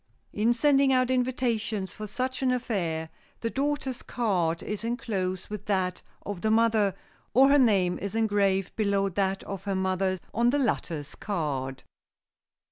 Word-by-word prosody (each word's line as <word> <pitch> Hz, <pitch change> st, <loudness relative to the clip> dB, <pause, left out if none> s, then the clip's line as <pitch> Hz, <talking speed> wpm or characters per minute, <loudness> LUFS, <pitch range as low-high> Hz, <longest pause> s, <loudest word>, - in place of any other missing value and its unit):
In 220 Hz, +3 st, +2 dB
sending 275 Hz, +2 st, +4 dB
out 255 Hz, -1 st, +3 dB
invitations 235 Hz, -6 st, -1 dB
for 215 Hz, -, -6 dB
such 255 Hz, +5 st, -3 dB
an 260 Hz, -, +2 dB
affair, 180 Hz, -11 st, -1 dB, 0.3 s
the 230 Hz, -, -1 dB
daughter's 275 Hz, -2 st, -1 dB
card 180 Hz, -8 st, 0 dB
is 210 Hz, +1 st, -4 dB
enclosed 195 Hz, -6 st, -2 dB
with 210 Hz, -1 st, -6 dB
that 185 Hz, -3 st, 0 dB, 0.2 s
of 200 Hz, -4 st, -5 dB
the 220 Hz, -, +1 dB
mother, 220 Hz, -3 st, +3 dB, 0.4 s
or 270 Hz, +2 st, +7 dB
her 285 Hz, +1 st, +6 dB
name 195 Hz, -8 st, +3 dB
is 200 Hz, +2 st, -4 dB
engraved 200 Hz, -4 st, +1 dB
below 200 Hz, -2 st, +1 dB
that 195 Hz, +1 st, -1 dB
of 195 Hz, -1 st, -7 dB
her 200 Hz, -1 st, -1 dB
mother 190 Hz, 0 st, 0 dB, 0.2 s
on 235 Hz, +1 st, +3 dB
the 280 Hz, -, +2 dB
latter's 165 Hz, -, -1 dB
card. 140 Hz, -9 st, -3 dB
210 Hz, 150 wpm, -27 LUFS, 190-245 Hz, 0.4 s, or